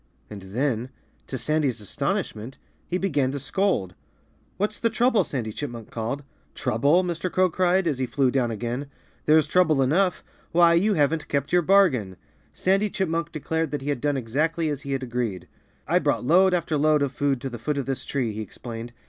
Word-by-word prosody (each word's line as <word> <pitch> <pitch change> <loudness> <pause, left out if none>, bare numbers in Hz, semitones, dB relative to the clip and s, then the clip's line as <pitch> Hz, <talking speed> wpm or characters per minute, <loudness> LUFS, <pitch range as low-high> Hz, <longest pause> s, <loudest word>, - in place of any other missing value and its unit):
And 105 -2 -7
then 120 +5 -2 0.4
to 130 - -4
Sandy's 140 -2 0
astonishment 110 +4 -3 0.3
he 180 - -1
began 145 -9 0
to 140 - -3
scold. 140 - 0 0.6
"What's 210 +2 -1
the 230 - +2
trouble?" 235 0 +3
Sandy 115 -6 -4
Chipmunk 120 -5 -6
called. 120 +6 -3 0.3
"Trouble?" 145 +11 +2
Mr. 175 0 -3
Crow 185 -1 +2
cried, 185 +2 +2
as 145 -6 0
he 130 - 0
flew 135 -1 +1
down 125 -3 +1
again. 120 +5 -3 0.4
"There's 155 0 +5
trouble 160 -6 +3
enough. 170 +8 +2 0.3
Why, 170 0 +6
you 200 +5 +3
haven't 155 +1 +1
kept 140 +1 -2
your 180 - +5
bargain!" 150 - +3 0.3
Sandy 195 +3 +1
Chipmunk 170 -4 -2
declared 160 0 -2
that 145 -2 -4
he 145 - -3
had 140 -4 -1
done 145 -1 +1
exactly 155 +7 0
as 145 -2 -3
he 140 -2 -4
had 135 -1 -2
agreed. 120 -7 -3 0.4
"I - - +3
brought - - 0
load 180 +5 +5
after 165 -3 -1
load 150 0 +3
of 140 - -1
food 140 0 0
to 135 - -3
the 120 - -7
foot 145 +5 -2
of 140 - -2
this 135 -1 -3
tree," 130 -5 -2
he 105 +1 -5
explained. 115 +2 -8
145 Hz, 190 wpm, -25 LUFS, 125-170 Hz, 0.6 s, Why